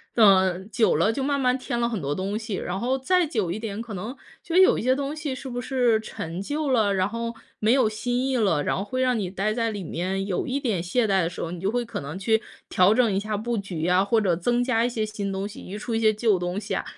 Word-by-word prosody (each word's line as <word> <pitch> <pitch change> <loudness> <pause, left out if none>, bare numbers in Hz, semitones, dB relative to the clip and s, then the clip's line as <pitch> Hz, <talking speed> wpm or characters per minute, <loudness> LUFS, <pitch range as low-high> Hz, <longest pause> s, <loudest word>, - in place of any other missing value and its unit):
呃， 190 -5 +5
久 220 +2 +2
了 200 +8 +2
就 270 - -2
慢 280 +1 0
慢 255 -1 +2
添 250 -2 -3
了 235 - +2
很 225 -6 -3
多 140 0 -1
东 195 +5 -2
西， 220 -2 -4
然 185 0 -3
后 255 +4 0
再 355 +7 +2
久 220 - -1
一 185 - -2
点 215 -1 -4
可 230 -2 -7
能 215 +8 -5 0.3
就 335 - -4
有 375 0 +6
一 - - -2
些 255 +3 +3
东 280 +2 -3
西 300 -3 -3
是 260 +1 -7
不 245 0 -4
是 245 -3 +2
陈 170 -4 -6
旧 290 +7 -2
了， 220 -6 +3
然 185 -1 +1
后 230 +2 -4 0.3
没 215 +1 +3
有 255 -3 +4
新 245 +4 -1
意 265 - 0
了， 195 -11 +2
然 - - 0
后 195 - -2
会 255 +5 -3
让 255 -2 +2
你 195 -4 -2
待 195 +3 -1
在 230 0 0
里 205 -3 -5
面 185 +4 -2
有 185 - -1
一 265 +2 -1
点 220 - -1
懈 225 +7 +1
怠 195 -3 +2
的 165 - 0
时 175 - -10
候， 165 - -3
你 175 - -6
就 195 - 0
会 245 0 -1
可 225 -3 -5
能 150 +6 -6
去 220 +3 +2 0.3
调 185 +3 +5
整 240 0 +3
一 - - +1
下 210 +1 -2
布 235 +2 -2
局 180 -5 -3
啊， 180 +1 +4
或 220 +3 +2
者 190 -5 +2
增 240 +8 +1
加 240 -2 +2
一 240 - +1
些 225 -3 -2
新 210 -2 -4
东 195 +1 -3
西， 210 - -10
移 195 - -7
出 225 +2 -3
一 225 - +1
些 220 -1 +4
旧 215 -2 +2
东 180 +2 -2
西 210 - -4
啊。 - - -1
220 Hz, 305 characters per minute, -25 LUFS, 195-245 Hz, 0.3 s, 有